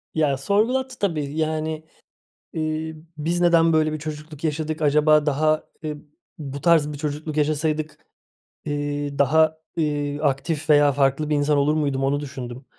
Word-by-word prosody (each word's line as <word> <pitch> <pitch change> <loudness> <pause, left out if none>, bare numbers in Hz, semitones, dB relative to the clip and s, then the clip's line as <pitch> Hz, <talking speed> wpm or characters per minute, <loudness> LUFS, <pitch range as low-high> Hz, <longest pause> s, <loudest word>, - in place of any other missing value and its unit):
Ya, 150 -4 +2
sorgulattı 240 - 0
tabii. 155 -6 -2
Yani, 155 0 -2 0.7
eee, 155 0 -3 0.2
"Biz 170 +4 -1
neden 170 -1 +4
böyle 155 -1 +2
bir 155 - -3
çocukluk 150 0 -8
yaşadık? 155 0 -2
Acaba 150 +1 +4
daha, 155 +2 +1 0.2
eee, 155 -1 -4 0.4
bu 140 -2 -6
tarz 155 -1 +3
bir 145 - -7
çocukluk 150 +1 -4
yaşasaydık, 155 0 -1 0.6
eee, 145 -1 -3
daha, 155 +3 +3 0.2
eee, 145 -2 -1
aktif 150 +2 -1
veya 145 -1 +6
farklı 140 +2 +1
bir 150 - +2
insan 145 0 +2
olur 145 +2 +2
muydum?", 140 -3 0
onu 140 +1 +1
düşündüm. 130 -2 -7
150 Hz, 145 wpm, -23 LUFS, 145-155 Hz, 0.7 s, veya